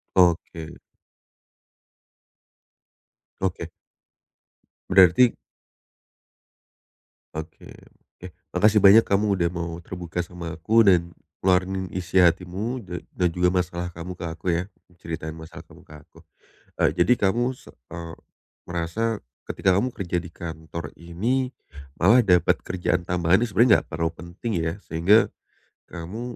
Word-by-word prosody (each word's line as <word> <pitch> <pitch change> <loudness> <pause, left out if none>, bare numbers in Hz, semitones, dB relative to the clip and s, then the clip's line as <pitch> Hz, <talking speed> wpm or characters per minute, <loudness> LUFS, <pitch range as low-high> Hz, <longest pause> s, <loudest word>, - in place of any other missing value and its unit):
Oke. 85 -2 +1 2.6
Oke. 90 -3 -2 1.2
Berarti 95 +6 +6 2.0
Oke. 80 +1 -8 0.5
Oke, 90 - -9 0.3
makasih 105 +3 +4
banyak 105 +3 +8
kamu 100 +1 +1
udah 85 -1 +1
mau 85 -1 -4
terbuka 90 -1 -5
sama 85 -2 -7
aku 110 +7 +3
dan 85 -2 +3 0.3
ngeluarin 95 0 +1
isi 90 0 -2
hatimu, 95 +8 +1
dan 90 -3 -7
dan 90 -1 +1
juga 90 +1 +1
masalah 90 -1 -2
kamu 90 +1 -7
ke - - -6
aku, 85 - -17
ya, 90 - -1 0.3
ceritain 80 -1 -6
masalah 80 +2 -10
kamu - - -17
ke 75 - -15
aku. - - -24 0.6
Eee, - - +2
jadi 125 - +4
kamu 120 +6 +1
se 130 - -14 0.2
eee, 85 -1 -7 0.5
merasa 90 +6 -2 0.2
ketika 95 -1 +1
kamu 105 +7 +1
kerja 90 -6 -5
di 90 - -10
kantor 80 -2 -8
ini, 115 +11 -2 0.5
malah 115 +8 +6
dapat 90 -4 +4
kerjaan 90 -1 -1
tambahan 90 +2 +2
yang 120 - -2
sebenarnya 120 +1 +4
enggak - - -27
terlalu 80 +2 -1
penting, 85 +8 -7
ya. 80 -1 -1
Sehingga 90 +7 +4 0.6
kamu 90 +7 -7
90 Hz, 125 wpm, -24 LUFS, 85-95 Hz, 2.6 s, banyak